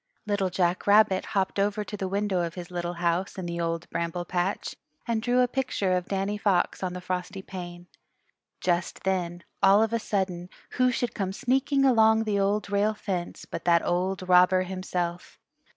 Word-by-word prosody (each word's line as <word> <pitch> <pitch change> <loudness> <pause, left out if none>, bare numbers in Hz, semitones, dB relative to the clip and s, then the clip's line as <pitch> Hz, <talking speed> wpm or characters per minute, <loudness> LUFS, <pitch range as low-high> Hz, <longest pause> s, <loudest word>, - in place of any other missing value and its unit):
Little 205 -3 0
Jack 180 0 0
Rabbit 205 -2 +5
hopped 195 +1 0
over 205 +1 +1
to 210 - -7
the 195 -2 -3
window 195 -1 0
of 170 -1 -3
his 180 0 -8
little 175 0 -3
house 175 +3 -1
in 185 - -4
the 170 0 -3
Old 165 0 -2
Bramble 170 +1 -2
Patch 180 +3 -2 0.3
and 230 -2 0
drew 245 +2 +2
a 250 - +4
picture 245 -7 -1
of 180 0 -2
Danny 195 +1 -2
Fox 200 -4 +1
on 185 -1 -2
the 180 - -6
frosty 185 +1 -4
pane. 175 -2 -8 0.8
Just 175 -1 -1
then, 175 -2 -1 0.2
all 195 +2 +6
of 225 0 -1
a 230 - +2
sudden, 185 -4 -2 0.2
who 255 0 +2
should 245 -1 -1
come 190 -2 -2
sneaking 270 +5 +1
along 220 -3 +5
the 210 -2 0
Old 200 +1 0
Rail 205 +2 +2
Fence 185 -4 -4
but - - -6
that 170 -1 +4
old 185 +1 -1
robber 180 +1 +5
himself. 180 -2 -4
190 Hz, 185 wpm, -27 LUFS, 175-210 Hz, 0.8 s, all